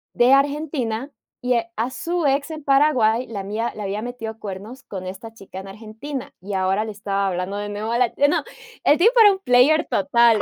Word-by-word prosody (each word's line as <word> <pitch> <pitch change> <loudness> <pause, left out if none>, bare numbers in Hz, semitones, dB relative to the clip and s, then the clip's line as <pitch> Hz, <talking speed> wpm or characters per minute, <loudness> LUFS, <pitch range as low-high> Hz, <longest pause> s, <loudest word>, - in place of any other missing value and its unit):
de 245 +2 +4
Argentina 275 -3 0 0.3
y 250 0 +1 0.2
a 230 +4 -1
su 335 +5 -2
ex 280 +3 +1
en 310 -2 -7
Paraguay, 260 -5 +3
la 205 -3 -5
había 215 +4 -3
le 215 - -7
había 200 +2 -3
metido 225 -2 -6
cuernos 210 +6 -8
con 185 -2 -7
esta 195 +5 -8
chica 195 -3 -10
en 195 - -9
Argentina, 220 +7 -7
y 200 +1 -6
ahora 190 +3 +1
le 215 - -5
estaba 200 -1 -2
hablando 185 +2 -3
de 205 0 -4
nuevo 210 +2 -4
a 235 - +1
la 250 - +4 0.2
no, - - +1 0.4
el 295 - +5
tipo 435 +8 +5
era 415 -3 +8
un 380 - -6
player 290 +1 +4
total, 230 +2 +3
230 Hz, 200 wpm, -22 LUFS, 205-275 Hz, 0.4 s, era